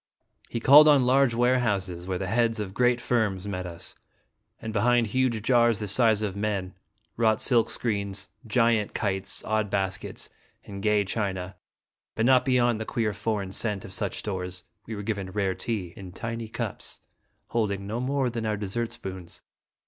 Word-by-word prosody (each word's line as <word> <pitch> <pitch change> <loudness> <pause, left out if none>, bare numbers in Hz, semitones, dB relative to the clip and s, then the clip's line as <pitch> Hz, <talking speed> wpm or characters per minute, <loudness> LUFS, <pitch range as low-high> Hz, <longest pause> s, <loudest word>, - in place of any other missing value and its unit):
He 115 - -3
called 145 +6 +8
on 140 -4 +6
large 130 -1 +4
warehouses, 105 -8 +1
where 95 -1 -1
the 95 - -3
heads 115 +3 +1
of 100 -3 -4
great 125 +2 +3
firms 105 -6 0
met 90 -2 -4
us; 85 -1 -8 0.7
and 110 -1 -6
behind 120 +2 +3
huge 120 +1 +1
jars 120 -2 +4
the 105 - -4
size 110 0 +3
of 100 -3 -2
men, 100 -3 -2 0.4
wrought 110 -2 +3
silk 120 -3 +3
screens, 100 -3 -3 0.2
giant 115 -2 +2
kites, 100 -1 -1
odd 110 -1 0
baskets, 95 -2 -3 0.4
and 100 -1 -7
gay 105 0 +2
china, 95 -2 -3 0.6
but 110 - +1
not 130 0 +5
be 130 - +2
yond 120 -3 +2
the - - 0
queer 110 -2 -1
foreign 100 -3 -2
scent 105 0 -2
of - - -10
such - - -2
stores, 90 -2 -4 0.2
we 110 - -5
were 100 - -6
given 100 -3 -3
rare 95 -1 0
tea 95 -2 -4
in 95 -2 -10
tiny 115 +2 -5
cups 110 - -5 0.5
holding 100 -4 -1
no 110 +4 -3
more 130 0 0
than 115 -1 -4
our 105 -1 0
dessert 110 +3 -3
spoons. 95 -6 -8
110 Hz, 170 wpm, -27 LUFS, 95-120 Hz, 0.7 s, called